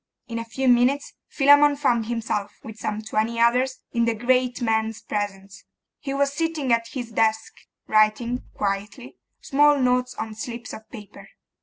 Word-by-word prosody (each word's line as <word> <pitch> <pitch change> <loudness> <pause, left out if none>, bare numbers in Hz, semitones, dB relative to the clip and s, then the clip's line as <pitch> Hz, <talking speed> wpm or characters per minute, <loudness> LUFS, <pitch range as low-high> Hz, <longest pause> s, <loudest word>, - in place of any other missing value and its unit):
In 230 -1 -4
a 230 - -5
few 260 +4 -3
minutes 250 +3 +3
Philammon 285 +1 +5
found 240 -6 +1
himself, 225 -3 -3
with 220 0 -10
some 215 0 -3
twenty 220 +2 -1
others, 250 +3 +2
in 235 -1 +1
the 230 -1 0
great 250 +2 +1
man's 220 -1 0
presence: 195 -2 -5 0.4
he 275 - -5
was 280 0 0
sitting 315 -5 0
at 230 0 +1
his 245 -4 -6
desk, 220 0 0 0.3
writing, 215 +3 +2
quietly, 205 +5 -4 0.2
small 290 +1 +4
notes 250 -1 +1
on 220 - -5
slips 235 +2 -7
of 220 - -11
paper. 210 -4 -12
235 Hz, 155 wpm, -24 LUFS, 220-260 Hz, 0.4 s, Philammon